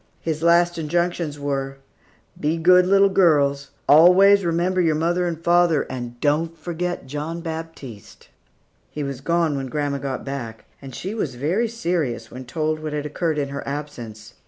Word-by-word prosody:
His 160 -1 -3
last 170 +1 +3
injunctions 170 -1 -1
were, 135 -1 -3 0.6
"Be 155 +3 0
good 180 +2 +5
little 195 +1 +5
girls; 145 -7 +2 0.2
always 185 +6 +7
remember 175 +2 +1
your 160 -3 +2
mother 175 +3 0
and 165 -2 -4
father; 170 -2 +3
and 120 -2 -6
don't 160 +4 0
forget 175 0 -4
John 150 +5 -5
Baptiste." 160 - -8 0.6
He 150 - -5
was 140 -2 -5
gone 165 0 +1
when 135 -1 -3
grandma 140 +1 -2
got 135 -1 -5
back; 120 -5 -6 0.2
and 135 -3 -9
she 195 +3 -5
was 155 - -3
very 170 - 0
serious 170 - -2
when 130 +1 -9
told 155 +4 -2
what 155 -1 -5
had 150 0 -3
occurred 155 +1 -2
in 140 -2 -1
her 140 0 -5
absence. 120 -7 -7
155 Hz, 160 wpm, -22 LUFS, 140-175 Hz, 0.6 s, always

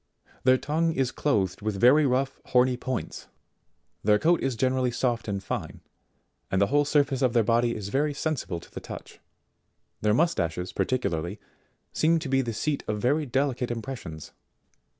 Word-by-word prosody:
Their 130 0 +6
tongue 160 +4 0
is 135 -4 0
clothed 100 - 0
with 105 -2 -2
very 140 +6 +6
rough 135 +1 0
horny 125 0 +3
points. 125 0 -5 0.8
Their 105 0 +4
coat 170 +8 +2
is 135 -2 -1
generally 130 +2 +1
soft 120 -2 -1
and 100 -2 -3
fine, - - -5 0.7
and 95 0 +1
the 100 - +5
whole 145 0 +4
surface 140 -2 +2
of 130 -3 +2
their 115 -2 +4
body 115 +2 +2
is 100 -2 -5
very 145 +4 0
sensible 140 - -2
to - - -16
the - - -6
touch; - - -10 0.8
their 105 0 +3
mustaches 90 - 0
particularly, 90 -6 -1 0.5
seem 165 +1 +3
to 155 -4 -4
be 135 0 +3
the 120 -3 -3
seat 140 +7 -2
of 105 -1 -1
very 145 +7 +1
delicate 130 -1 0
impressions. 115 - -6
125 Hz, 165 wpm, -27 LUFS, 105-140 Hz, 0.8 s, Their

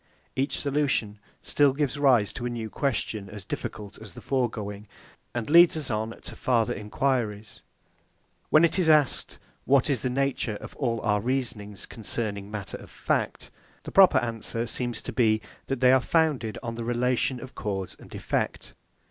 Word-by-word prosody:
Each 135 +2 -1
solution 135 -8 0 0.2
still 145 -2 +3
gives 145 0 -1
rise 125 -8 +4
to 120 - -4
a - - -2
new 115 -2 -5
question 110 -7 -2
as 105 -2 -9
difficult 105 0 -6
as 105 -5 -10
the - - -10
foregoing, 110 -5 -2 0.5
and 120 -2 -2
leads 170 +1 +7
us 145 -5 -2
on 110 +1 -3
to - - -9
farther 115 -4 +1
enquiries. 105 -1 -2 0.9
When 155 +2 +6
it 170 - 0
is 170 -3 +3
asked, 150 -4 +3 0.3
What 140 +1 +4
is 130 - 0
the 130 - 0
nature 130 -4 -1
of - - -9
all 115 -5 -1
our 105 -2 +1
reasonings 110 -5 -3
concerning 105 -2 -4
matter 105 -2 -5
of - - -13
fact? - - -2 0.3
the - - -7
proper 195 -2 +7
answer 115 0 -2
seems 120 0 -4
to - - -5
be, 110 -3 +3 0.3
that 135 -2 -2
they 125 0 +7
are 130 0 +5
founded 145 -9 +1
on 115 -1 -3
the 115 0 -5
relation 125 +2 +1
of 130 +1 -10
cause 95 -4 -4
and - - -12
effect. - - -2
120 Hz, 170 wpm, -27 LUFS, 105-135 Hz, 0.9 s, leads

